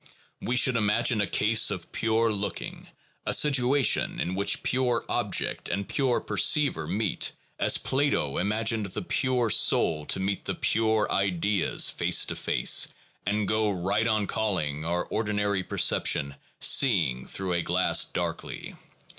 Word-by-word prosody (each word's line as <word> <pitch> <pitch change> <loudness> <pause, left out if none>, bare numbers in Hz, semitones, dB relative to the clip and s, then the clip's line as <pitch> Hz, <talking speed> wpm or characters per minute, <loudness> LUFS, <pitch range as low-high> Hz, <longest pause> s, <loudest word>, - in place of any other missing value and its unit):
We 125 - -2
should 125 -1 +3
imagine 110 +1 +1
a 100 - -1
case 110 +5 +3
of 95 -5 -5
pure 115 0 +1
looking, 105 -1 -5 0.4
a - - +1
situation 140 -1 +2
in 90 - -2
which 100 +2 -1
pure 125 -2 0
object - - -1
and 100 +3 -3
pure 130 -4 +1
perceiver 140 - +1
meet, 100 +3 -1 0.3
as - - +3
Plato 135 - -1
imagined 110 +2 -1
the 95 - -4
pure 125 -4 0
soul 75 -5 +2
to - - 0
meet 95 +1 -3
the - - -2
pure 110 -1 +1
ideas 100 0 +1
face - - +2
to - - -3
face; - - +2 0.4
and 105 0 0
go 110 0 +1
right 100 +4 -1
on 110 -2 +1
calling 90 -10 -2
our 85 +1 -1
or 110 - -2
dinary 105 -2 -1
perception 70 -5 +1 0.3
seeing 85 - +2
through 95 -2 -4
a 85 - 0
glass 90 +2 +2
darkly. - - -5
105 Hz, 145 wpm, -26 LUFS, 95-115 Hz, 0.4 s, should